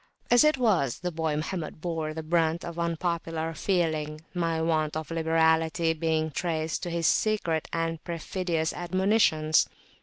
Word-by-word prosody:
As 245 Hz, +3 st, +7 dB
it 305 Hz, -2 st, +4 dB
was, 190 Hz, -, +2 dB
the 180 Hz, 0 st, -2 dB
boy 160 Hz, -2 st, -1 dB
Mohammed 155 Hz, +1 st, -4 dB
bore 160 Hz, -2 st, -3 dB
the 160 Hz, +1 st, -5 dB
brunt 165 Hz, 0 st, +1 dB
of 170 Hz, 0 st, -6 dB
unpopular 165 Hz, -1 st, -2 dB
feeling, 155 Hz, -4 st, -1 dB
my 165 Hz, -2 st, 0 dB
want 155 Hz, -1 st, 0 dB
of 160 Hz, +1 st, -6 dB
liberality 160 Hz, 0 st, +2 dB
being 160 Hz, 0 st, 0 dB
traced 160 Hz, 0 st, -2 dB
to 175 Hz, -, -3 dB
his 170 Hz, -1 st, -1 dB
secret 170 Hz, -4 st, +1 dB
and 165 Hz, -1 st, -2 dB
perfidious 170 Hz, -1 st, -2 dB
admonitions. 175 Hz, -4 st, +2 dB
165 Hz, 145 wpm, -27 LUFS, 160-175 Hz, -, As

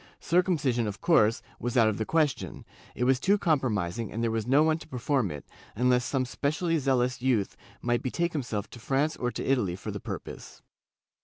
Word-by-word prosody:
Circumcision, 150 Hz, -, +1 dB
of 100 Hz, -1 st, -5 dB
course, 110 Hz, -10 st, +3 dB, 0.2 s
was 120 Hz, +1 st, -2 dB
out 115 Hz, -2 st, +6 dB
of 110 Hz, -1 st, -1 dB
the 110 Hz, -, -2 dB
ques 155 Hz, -3 st, +3 dB
tion; -, -, -9 dB, 0.3 s
it -, -, -1 dB
was 130 Hz, 0 st, +3 dB
too 200 Hz, +9 st, +3 dB
compromising 115 Hz, -, 0 dB
and 115 Hz, +3 st, -3 dB
there 115 Hz, -, +1 dB
was 110 Hz, 0 st, -2 dB
no 140 Hz, +4 st, +5 dB
one 160 Hz, 0 st, +2 dB
to -, -, -12 dB
perform 130 Hz, -3 st, 0 dB
it, 75 Hz, -3 st, -7 dB, 0.3 s
unless 125 Hz, +2 st, +3 dB
some 130 Hz, +1 st, 0 dB
specially 155 Hz, +5 st, -1 dB
zealous 130 Hz, -2 st, +1 dB
youth 120 Hz, -6 st, +1 dB, 0.3 s
might 120 Hz, 0 st, +1 dB
betake 170 Hz, +7 st, -1 dB
himself 120 Hz, -9 st, -3 dB
to 120 Hz, -, -10 dB
France 140 Hz, +6 st, 0 dB
or 125 Hz, -, -1 dB
to -, -, -5 dB
Italy 120 Hz, -10 st, +1 dB
for -, -, -6 dB
the -, -, -5 dB
purpose. -, -, -8 dB
125 Hz, 200 wpm, -28 LUFS, 115-145 Hz, 0.3 s, out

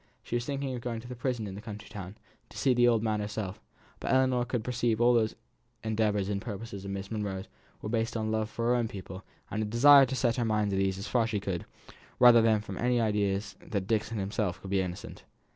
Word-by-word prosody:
She -, -, -4 dB
was 120 Hz, 0 st, -1 dB
thinking 140 Hz, -1 st, -3 dB
of 125 Hz, -, -5 dB
going 115 Hz, -1 st, -3 dB
to 120 Hz, -, -11 dB
the 125 Hz, -, -6 dB
prison 125 Hz, -2 st, -2 dB
in 100 Hz, -, -6 dB
the 100 Hz, -, -7 dB
county 105 Hz, -1 st, -8 dB
town, 100 Hz, -1 st, -8 dB, 0.3 s
to -, -, -12 dB
see 130 Hz, -, +3 dB
the 120 Hz, 0 st, +4 dB
old 115 Hz, -2 st, +3 dB
man 110 Hz, -2 st, 0 dB
herself, 105 Hz, -2 st, -4 dB, 0.4 s
but -, -, -2 dB
Ellinor 130 Hz, -2 st, +3 dB
could 120 Hz, -2 st, -2 dB
perceive 120 Hz, -2 st, 0 dB
that 120 Hz, -, +2 dB
all 120 Hz, +1 st, +6 dB
these 110 Hz, -1 st, -1 dB, 0.5 s
endeavours 105 Hz, -3 st, +1 dB
and 100 Hz, -1 st, -2 dB
purposes 105 Hz, -2 st, -6 dB
of 100 Hz, -, -6 dB
Miss 100 Hz, +1 st, -5 dB
Monro's 100 Hz, -3 st, -3 dB, 0.4 s
were -, -, -3 dB
based 115 Hz, 0 st, -1 dB
on 110 Hz, -1 st, -1 dB
love 110 Hz, 0 st, 0 dB
for 115 Hz, -, -3 dB
her 125 Hz, -, +4 dB
own 120 Hz, -2 st, +1 dB
pupil, 95 Hz, -1 st, -8 dB, 0.3 s
and 110 Hz, -, -1 dB
a -, -, 0 dB
desire 135 Hz, +5 st, +7 dB
to 130 Hz, -, -3 dB
set 120 Hz, -1 st, +1 dB
her 120 Hz, -, +1 dB
mind 105 Hz, -2 st, +1 dB
at 95 Hz, -, +1 dB
ease 95 Hz, -1 st, +1 dB
as 100 Hz, -, -6 dB
far 120 Hz, -3 st, +2 dB
as -, -, -3 dB
she 105 Hz, -2 st, -1 dB
could, 95 Hz, -3 st, -4 dB, 0.5 s
rather 120 Hz, -2 st, +8 dB
than 110 Hz, -2 st, +3 dB
from 100 Hz, -3 st, -7 dB
any 125 Hz, 0 st, +2 dB
idea 105 Hz, -3 st, +1 dB, 0.2 s
that 100 Hz, -3 st, -3 dB
Dixon 110 Hz, +1 st, -1 dB
himself 95 Hz, -2 st, -2 dB
could 95 Hz, -, -9 dB
be 95 Hz, -1 st, +3 dB
innocent. 90 Hz, -1 st, -6 dB
110 Hz, 245 wpm, -29 LUFS, 100-120 Hz, 0.5 s, rather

